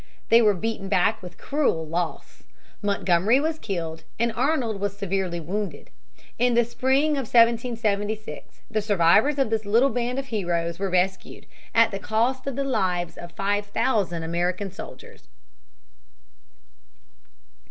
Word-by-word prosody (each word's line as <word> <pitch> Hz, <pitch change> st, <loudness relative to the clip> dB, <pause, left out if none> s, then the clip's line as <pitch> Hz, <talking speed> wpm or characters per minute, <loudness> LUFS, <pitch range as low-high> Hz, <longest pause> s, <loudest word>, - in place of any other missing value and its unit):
They 230 Hz, +1 st, +7 dB
were 210 Hz, -3 st, +4 dB
beaten 200 Hz, 0 st, -3 dB
back 210 Hz, +3 st, +2 dB
with 180 Hz, -1 st, -10 dB
cruel 275 Hz, -, 0 dB
loss. 165 Hz, +1 st, -4 dB, 0.4 s
Montgomery 200 Hz, +3 st, +2 dB
was 315 Hz, +1 st, -1 dB
killed, 165 Hz, -5 st, -4 dB
and 235 Hz, +1 st, +1 dB
Arnold 245 Hz, -5 st, 0 dB
was 200 Hz, 0 st, -3 dB
severely 190 Hz, -3 st, -2 dB
wounded. 195 Hz, +5 st, -5 dB, 0.5 s
In 245 Hz, -1 st, +3 dB
the 240 Hz, 0 st, +4 dB
spring 265 Hz, +5 st, +1 dB
of 275 Hz, -6 st, -2 dB
1776 225 Hz, -3 st, +1 dB
the 215 Hz, -1 st, 0 dB
survivors 205 Hz, -, +3 dB
of 270 Hz, -5 st, +1 dB
this 220 Hz, -1 st, 0 dB
little 230 Hz, +7 st, +3 dB
band 245 Hz, +1 st, -2 dB
of 270 Hz, 0 st, -4 dB
heroes 170 Hz, -5 st, -2 dB
were 195 Hz, 0 st, -1 dB
rescued 185 Hz, +1 st, -1 dB, 0.3 s
at 230 Hz, 0 st, +5 dB
the 195 Hz, -, -4 dB
cost 235 Hz, +7 st, 0 dB
of 275 Hz, -, -2 dB
the 275 Hz, -, -1 dB
lives 180 Hz, -10 st, -1 dB
of 175 Hz, -, -9 dB
five 205 Hz, +3 st, -1 dB
thousand 205 Hz, -7 st, 0 dB
American 175 Hz, +4 st, -2 dB
soldiers. 190 Hz, -, -11 dB
210 Hz, 140 wpm, -25 LUFS, 185-240 Hz, 0.5 s, They